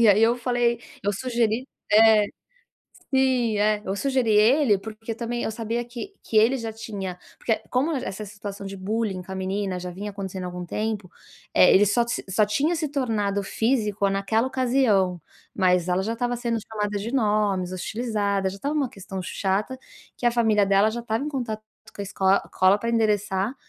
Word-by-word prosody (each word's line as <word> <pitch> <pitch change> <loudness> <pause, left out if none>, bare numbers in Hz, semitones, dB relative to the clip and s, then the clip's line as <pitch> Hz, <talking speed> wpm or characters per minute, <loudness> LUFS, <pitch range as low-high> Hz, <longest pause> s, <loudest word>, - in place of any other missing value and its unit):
e 225 - +7
aí 205 +1 +6
eu 235 +2 +4
falei 240 -1 0 0.2
eu 205 - +1
sugeri 235 +2 0 0.3
é, 220 -1 +7 0.9
sim, 255 -4 +2
é, 210 0 +2
eu 190 - -2
sugeri 260 -1 +1
ele 220 +2 +5
porque 220 +3 -7
também 240 +1 -3
eu - - -1
sabia 230 +2 -2
que 245 +12 -8
que 220 - 0
ele 230 +5 +5
já 230 -2 -4
tinha 205 -5 -6 0.2
porque 225 - 0
como 270 +6 +1
essa 215 -6 -4
situação 200 0 -8
de 195 0 -6
bullying 200 0 -2
com 190 - -11
a - - -4
menina 190 0 -2
já 180 0 -6
vinha 205 +3 -6
acontecendo 190 -2 -6
há - - -3
algum 180 0 -6
tempo, 210 0 -3 0.4
eh, 180 - +7
ele 205 +2 +6
só 235 +4 +2
se 235 - -2
só 210 +3 +3
tinha 290 +11 +1
se 310 -2 -1
tornado 210 -8 -1
físico 210 -3 0
naquela 200 +5 +1
ocasião, 240 -9 +2 0.3
mas 180 -2 +2
ela 180 +1 +2
já 225 +3 -2
tava 245 +1 -1
sendo 235 -1 -1
chamada 210 -2 -2
de 215 +4 -4
nomes, 210 -6 +1
hostilizada, 200 -1 -1
já 190 - -7
estava 285 +8 -2
uma 280 -4 +1
questão 195 -2 -7
chata, 195 +7 -2 0.4
que - - -5
a 240 - +5
família 220 -4 +3
dela 195 +2 +4
já 235 +2 -4
estava 230 +3 -2
em 300 - -2
contato 235 -6 -3 0.3
com - - -5
a - - -2
escol 195 -1 0 0.2
...cola 185 +2 +4
pra 230 +3 -3
endereçar. 210 -2 +1
215 Hz, 190 wpm, -25 LUFS, 195-235 Hz, 0.9 s, e